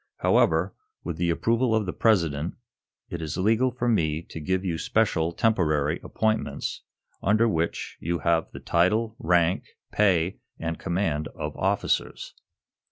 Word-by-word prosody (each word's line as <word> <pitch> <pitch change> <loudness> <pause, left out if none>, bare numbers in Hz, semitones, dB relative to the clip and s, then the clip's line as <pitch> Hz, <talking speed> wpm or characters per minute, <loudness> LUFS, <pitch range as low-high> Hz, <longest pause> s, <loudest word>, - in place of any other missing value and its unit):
However, - - +3 0.3
with - - -4
the 85 0 0
approval 115 +7 +1
of 110 -2 +1
the 90 - -3
President, 85 -8 +1 0.6
it 85 - -4
is 80 0 -4
legal 110 +7 +3
for 120 -1 -3
me 80 -8 +1
to - - -6
give 95 +5 -1
you 85 -3 -1
special, 85 -7 +1
temporary 80 -7 +1
appointments 110 0 -2 0.4
under 110 +4 +3
which 85 -5 -2
you 85 +2 -1
have 80 +1 +1
the - - -8
title, 110 +6 +1
rank, 90 -6 +2 0.3
pay 95 -3 +2 0.2
and 80 0 -3
command 85 -5 -1
of - - -5
officers. - - -1
90 Hz, 140 wpm, -26 LUFS, 80-110 Hz, 0.6 s, However